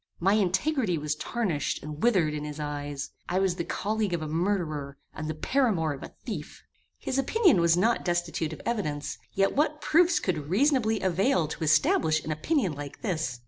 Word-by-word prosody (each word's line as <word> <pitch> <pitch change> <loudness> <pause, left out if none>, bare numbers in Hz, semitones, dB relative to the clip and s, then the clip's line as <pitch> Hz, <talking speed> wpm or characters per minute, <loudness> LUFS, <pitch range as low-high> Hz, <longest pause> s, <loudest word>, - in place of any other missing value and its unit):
My 195 +3 +3
integrity 205 - +1
was 150 0 -1
tarnished 170 - -2
and 150 0 -7
withered 185 -10 +3
in 150 -1 -4
his 150 0 -6
eyes. 145 -1 -4 0.2
I 180 - 0
was 190 -2 +2
the 170 - -1
colleague 210 0 -1
of 160 - -4
a - - -4
murderer, 155 -5 -1 0.2
and 155 - -5
the 155 - -3
paramour 175 - +1
of 135 - -9
a - - -10
thief! 180 - -6 0.3
His 265 - -2
opinion 330 - +4
was 170 0 +4
not 225 +6 +2
destitute 175 -2 -1
of 160 - -9
evidence: 150 -11 -2
yet 195 0 +1
what 300 +1 +1
proofs 340 +3 +4
could 155 - -2
reasonably 225 - +2
avail 190 - +2
to 160 - -5
establish 155 0 +3
an 155 - -2
opinion 190 - 0
like 145 -1 -8
this? 155 - -2
175 Hz, 185 wpm, -27 LUFS, 155-220 Hz, 0.3 s, opinion